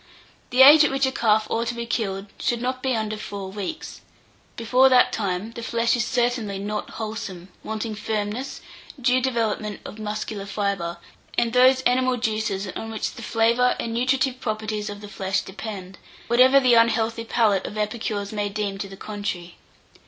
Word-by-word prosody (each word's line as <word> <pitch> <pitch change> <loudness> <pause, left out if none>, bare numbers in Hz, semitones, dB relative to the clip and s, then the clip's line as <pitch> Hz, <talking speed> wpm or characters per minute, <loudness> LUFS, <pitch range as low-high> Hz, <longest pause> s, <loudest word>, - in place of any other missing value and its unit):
The 255 +1 +6
age 295 +3 +10
at 300 - +3
which 270 0 +1
a 265 - 0
calf 220 -4 +2
ought 230 +1 0
to 240 - -2
be 235 0 -4
killed 195 -4 -2
should 240 -3 0
not 255 +1 -2
be 260 -2 0
under 215 -1 -2
four 200 -2 -6
weeks: 210 +11 -6 0.6
before 250 +3 +4
that 255 -1 +5
time 200 0 -2
the 235 - -8
flesh 230 +1 +1
is 240 - 0
certainly 240 -4 0
not 210 +2 -4
wholesome, 205 -5 -6
wanting 220 0 -4
firmness, 215 +4 -3 0.4
due 255 0 +3
development 225 -4 -1
of 215 - -9
muscular 210 -1 -4
fibre, 195 -4 -2 0.4
and 235 -1 +1
those 255 +1 +5
animal 255 0 +2
juices 215 -4 -1
on 225 +4 -6
which 220 -1 -3
the - - -10
flavour 235 +2 +2
and 230 - -3
nutritive 255 +1 +1
properties 215 -2 -3
of 205 0 -7
the 205 - -8
flesh 195 -1 -1
depend, 195 -2 -8 0.3
whatever 255 +3 +6
the 255 -2 +4
unhealthy 230 0 +3
palate 220 -4 +1
of 210 - -7
epicures 210 -1 -2
may 205 -1 -1
deem 200 -1 -3
to 195 - -4
the 195 - -10
contrary. 195 -5 -5
220 Hz, 175 wpm, -24 LUFS, 205-245 Hz, 0.6 s, age